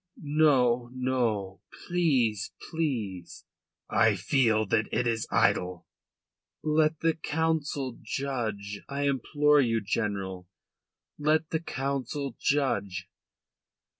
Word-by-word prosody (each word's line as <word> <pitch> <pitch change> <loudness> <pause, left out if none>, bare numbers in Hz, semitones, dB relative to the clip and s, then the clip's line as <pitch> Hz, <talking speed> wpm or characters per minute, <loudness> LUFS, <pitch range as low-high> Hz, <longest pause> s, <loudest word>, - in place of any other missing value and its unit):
"No, 135 -5 +3
no. 115 -8 -1 0.2
Please, 130 - +1 0.2
please." 115 - -3 0.4
"I 110 -2 +3
feel 110 +2 +2
that 110 +2 0
it 125 +2 +1
is 115 -2 0
idle." 90 -1 +1 0.8
"Let 155 0 +2
the 165 0 +3
Council 150 -5 -1
judge. 110 -5 -3
I 140 +1 -2
implore 145 +2 +3
you, 115 -3 +1
General, 100 -4 -3 0.7
let 155 +2 +1
the 160 - +1
Council 140 -2 -3
judge." 100 -10 0
125 Hz, 95 wpm, -28 LUFS, 105-145 Hz, 0.8 s, No